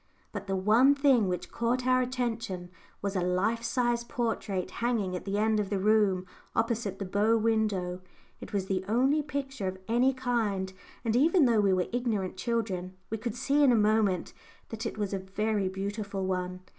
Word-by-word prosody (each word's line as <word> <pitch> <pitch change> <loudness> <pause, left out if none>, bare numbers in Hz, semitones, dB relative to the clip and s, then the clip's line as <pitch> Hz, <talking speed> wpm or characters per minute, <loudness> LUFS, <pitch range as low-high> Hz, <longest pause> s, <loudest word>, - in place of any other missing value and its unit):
But 200 -2 -6
the 195 - 0
one 225 +9 +5
thing 270 -7 +4
which 180 -1 -3
caught 245 +2 0
our 255 0 +4
attention 230 -8 -3 0.3
was 200 0 -2
a 185 - +1
life 185 +6 +1
size 240 0 0
portrait 225 -7 -2
hanging 220 -6 0
at 180 - -6
the 200 0 -1
end 215 0 +2
of 205 -2 -1
the 200 - 0
room 200 -2 +3 0.3
opposite 225 -4 0
the 195 - -4
bow 210 +4 +2
window. 210 -5 0 0.4
It - - -9
was 200 -2 -1
the 190 -1 -1
only 265 +8 +3
picture 275 -7 -4
of 185 0 -3
any 240 +4 +3
kind, 225 -7 -1 0.3
and 225 0 +1
even 315 +4 +5
though 230 -4 +4
we 200 -1 +3
were 185 -1 +2
ignorant 220 -7 -1
children, 190 -3 -2 0.2
we 220 - -2
could 230 0 -4
see 280 +4 +2
in 270 - +6
a - - +4
moment 210 -4 +2 0.4
that 225 +1 -4
it - - -6
was 205 -2 -2
a 195 - -1
very 200 +1 -1
beautiful 200 0 -4
one. 185 -1 -2
215 Hz, 185 wpm, -29 LUFS, 190-240 Hz, 0.4 s, in